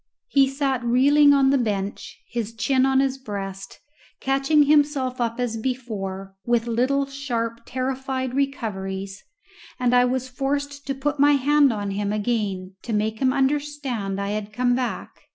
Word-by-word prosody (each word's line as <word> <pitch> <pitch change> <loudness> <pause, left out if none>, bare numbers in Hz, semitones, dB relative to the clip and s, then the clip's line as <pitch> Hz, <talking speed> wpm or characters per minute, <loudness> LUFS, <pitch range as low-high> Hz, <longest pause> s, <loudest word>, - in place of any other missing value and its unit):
He 275 - +4
sat 270 -2 -1
reeling 285 +5 +5
on 275 -1 +4
the 275 - +3
bench, 205 -4 -3
his 230 -1 -4
chin 260 +3 +2
on 265 0 +3
his 270 -1 -1
breast, 195 -5 -6 0.4
catching 275 +3 +3
himself 285 -3 +2
up 230 0 -1
as 240 -2 -1
before 210 -6 -4
with 235 0 +1
little 255 +4 +1
sharp 240 -5 -3
terrified 260 0 -3
recoveries, 195 -8 -3 0.6
and 250 -1 +2
I 245 0 +5
was 260 +1 -1
forced 280 +2 -3
to 275 - -1
put 290 +2 -2
my 290 +1 +6
hand 285 0 +4
on 205 -2 -3
him 200 +1 -2
again 205 -4 -2
to 235 - -5
make 215 +1 -1
him 260 -1 +3
understand 270 -7 -1
I 200 0 -2
had 210 0 -4
come 245 +3 +1
back. 250 0 -2
255 Hz, 155 wpm, -23 LUFS, 215-275 Hz, 0.6 s, my